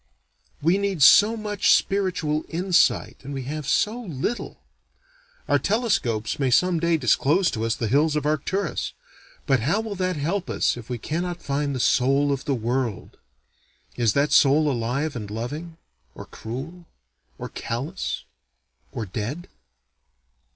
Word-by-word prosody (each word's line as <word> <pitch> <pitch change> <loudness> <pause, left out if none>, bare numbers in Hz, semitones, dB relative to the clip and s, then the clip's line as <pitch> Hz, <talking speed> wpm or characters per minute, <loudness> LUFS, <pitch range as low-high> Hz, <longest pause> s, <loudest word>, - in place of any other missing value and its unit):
We 175 +5 +3
need 195 -7 0
so 210 +10 +7
much 210 -2 +1
spiritual 180 -6 +1
insight, 180 +2 +2
and 140 +1 -6
we 135 - -4
have 150 +2 -5
so 225 +4 +1
little. 185 - -4 0.9
Our - - +3
telescopes 145 - 0
may 135 -2 +1
some 170 +6 +3
day 170 0 +2
disclose 150 - +2
to 115 -2 -2
us 115 - 0
the 115 - -2
hills 150 +6 +2
of 150 -2 -1
Arcturus, 155 +7 -1 0.5
but 135 -3 +3
how 155 - +1
will 220 -2 -4
that 185 -2 -1
help 175 +6 -2
us - - +1
if 120 -1 -10
we 125 - -2
cannot 175 +7 -4
find 140 0 -1
the - - -3
soul 135 +4 +3
of 135 -1 -3
the 140 - 0
world? 120 -1 -3 0.8
Is 115 -4 +2
that 140 +1 +1
soul 150 +1 +5
alive 130 +5 -2
and 105 -4 -5
loving? 150 +10 -6 0.4
or - - -9
cruel? 155 +10 -8 0.5
or - - -6
callous? 140 +11 -4 0.7
or 115 - -4
dead? 115 - -5
150 Hz, 145 wpm, -24 LUFS, 125-180 Hz, 0.9 s, so